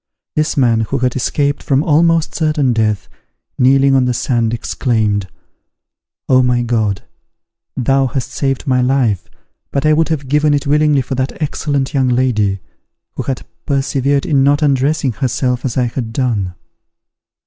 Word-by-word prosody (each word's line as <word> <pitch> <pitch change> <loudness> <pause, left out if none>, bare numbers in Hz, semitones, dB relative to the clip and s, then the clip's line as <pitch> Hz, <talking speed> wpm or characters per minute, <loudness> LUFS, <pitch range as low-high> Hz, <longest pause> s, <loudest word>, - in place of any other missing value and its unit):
This 155 -1 0
man, 120 -4 +3
who 135 - 0
had 125 -1 -1
escaped 140 +3 -1
from 140 +1 +1
almost 165 +1 +2
certain 150 -5 +1
death, 110 -3 0 0.5
kneeling 135 +1 +4
on 130 -1 +3
the 125 -1 0
sand, 120 -2 0
exclaimed, 110 -4 -1 1.0
"Oh, 130 0 +4
my 125 -1 +1
God! 110 -4 -1 0.7
thou 135 +1 +2
hast 130 0 -4
saved 135 0 -2
my 130 -3 +2
life, 125 -6 0 0.4
but 140 +1 -2
I 155 - +5
would 160 +1 +1
have 145 -4 -2
given 150 +2 +2
it 145 - -2
willingly 150 -1 +3
for 130 - -5
that 130 +1 -3
excellent 145 -2 -2
young 135 -2 +2
lady, 110 -6 +1 0.5
who - - -4
had 135 -2 -4 0.2
persevered 140 0 0
in 140 -4 +2
not 145 +2 +3
undressing 140 0 +1
herself 125 +2 -1
as 125 -1 -2
I 125 - +3
had 115 -1 -4
done." 110 -8 -1
130 Hz, 155 wpm, -16 LUFS, 120-145 Hz, 1.0 s, I